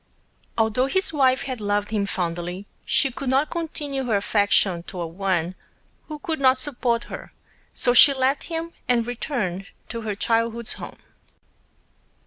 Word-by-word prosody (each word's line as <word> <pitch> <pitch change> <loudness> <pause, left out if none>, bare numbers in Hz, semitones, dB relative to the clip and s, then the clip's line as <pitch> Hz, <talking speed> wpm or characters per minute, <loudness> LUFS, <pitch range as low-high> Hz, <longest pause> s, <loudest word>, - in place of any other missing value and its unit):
Although 225 +3 +2
his 380 +3 +2
Wife 260 -3 +3
had 255 -4 -5
loved 205 0 0
him 205 -2 0
Fondly, 175 +1 -3 0.2
she 275 - +2
could 260 +1 -4
not 270 +3 +2
Continue 295 -5 -3
her 230 -4 +1
affection 200 -3 +2
toward 170 -2 -6
One 185 -3 0 0.5
who 305 - -6
could 315 +1 -3
not 260 -1 +5
Support 245 -3 -1
her, - - -9 0.4
so 245 - +3
she 280 +4 +9
left 270 +1 +1
him 330 0 -4
and 240 -2 +2
Returned 210 - -3 0.2
to 230 - -4
her 215 -2 -3
Childhood's 230 +2 0
Home. - - -9
235 Hz, 145 wpm, -24 LUFS, 200-270 Hz, 0.5 s, she